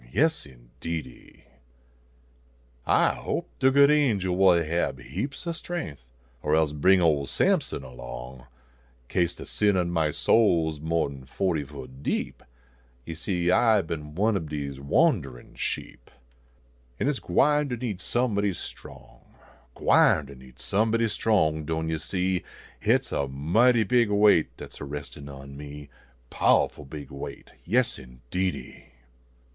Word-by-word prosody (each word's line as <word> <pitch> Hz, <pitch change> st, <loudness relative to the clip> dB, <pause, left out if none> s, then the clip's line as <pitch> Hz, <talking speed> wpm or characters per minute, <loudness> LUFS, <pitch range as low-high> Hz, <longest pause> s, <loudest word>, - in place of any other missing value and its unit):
Yes, 160 Hz, -, +1 dB
indeedy! 65 Hz, +3 st, -8 dB, 1.4 s
I -, -, +4 dB
hoj)e -, -, -2 dB
de 130 Hz, -, +5 dB
good 140 Hz, +2 st, +6 dB
angel 105 Hz, -12 st, +2 dB
will 90 Hz, -3 st, +5 dB
hab 80 Hz, -4 st, -1 dB
heaps 135 Hz, -, -5 dB
o 170 Hz, -, -1 dB
strength, 165 Hz, -, -6 dB, 0.4 s
Or 75 Hz, +1 st, +1 dB
else 80 Hz, -2 st, +2 dB
bring 95 Hz, +6 st, +4 dB
old 75 Hz, -5 st, +2 dB
Sampson -, -, +1 dB
along, -, -, -9 dB, 0.6 s
Kase 85 Hz, -1 st, +1 dB
the -, -, -9 dB
sin 105 Hz, -2 st, +1 dB
on 85 Hz, -1 st, 0 dB
my 80 Hz, -3 st, +1 dB
soul 85 Hz, -2 st, +3 dB
s 75 Hz, -, -12 dB
mo 80 Hz, +2 st, 0 dB
en 70 Hz, -2 st, -8 dB
fo 95 Hz, +6 st, -1 dB
ty 75 Hz, -2 st, -1 dB
foot 65 Hz, -2 st, -11 dB
deep -, -, -2 dB, 0.6 s
Yo 85 Hz, -, -5 dB
see, 90 Hz, +1 st, 0 dB
I 110 Hz, -1 st, +4 dB
bin 75 Hz, -2 st, -6 dB
one 105 Hz, +4 st, +2 dB
ob 80 Hz, -6 st, -3 dB
dese 70 Hz, -3 st, -5 dB
wanderin 70 Hz, -, +1 dB
sheep, -, -, -5 dB, 0.9 s
An" -, -, 0 dB
hit 145 Hz, -1 st, +1 dB
s -, -, -7 dB
gwine 145 Hz, +10 st, +2 dB
ter 125 Hz, -, -1 dB
need 115 Hz, -6 st, -4 dB
somebody 105 Hz, -5 st, 0 dB
strong, -, -, -11 dB, 0.4 s
Gwine 75 Hz, -, +4 dB
ter 70 Hz, -, -11 dB
need 65 Hz, -1 st, -16 dB
somebody 115 Hz, -, +1 dB
strong, 80 Hz, -8 st, +1 dB
doan 80 Hz, +1 st, -2 dB
yo 80 Hz, -1 st, -1 dB
see; 90 Hz, +2 st, -1 dB, 0.4 s
Hit -, -, +3 dB
s -, -, -12 dB
a 70 Hz, -, -1 dB
mighty 110 Hz, -, +3 dB
big 120 Hz, +2 st, +3 dB
weight 105 Hz, -5 st, +4 dB
dat -, -, -9 dB
s -, -, -11 dB
a -, -, -4 dB
restin 70 Hz, 0 st, -7 dB
on 70 Hz, 0 st, -10 dB
me. 75 Hz, 0 st, -9 dB, 0.4 s
Pow -, -, +4 dB
ful 75 Hz, -, -13 dB
big 70 Hz, 0 st, -9 dB
weight! 70 Hz, 0 st, -8 dB
Yes, 120 Hz, +7 st, +1 dB
indeedy 65 Hz, +9 st, -5 dB
80 Hz, 150 wpm, -26 LUFS, 70-105 Hz, 1.4 s, good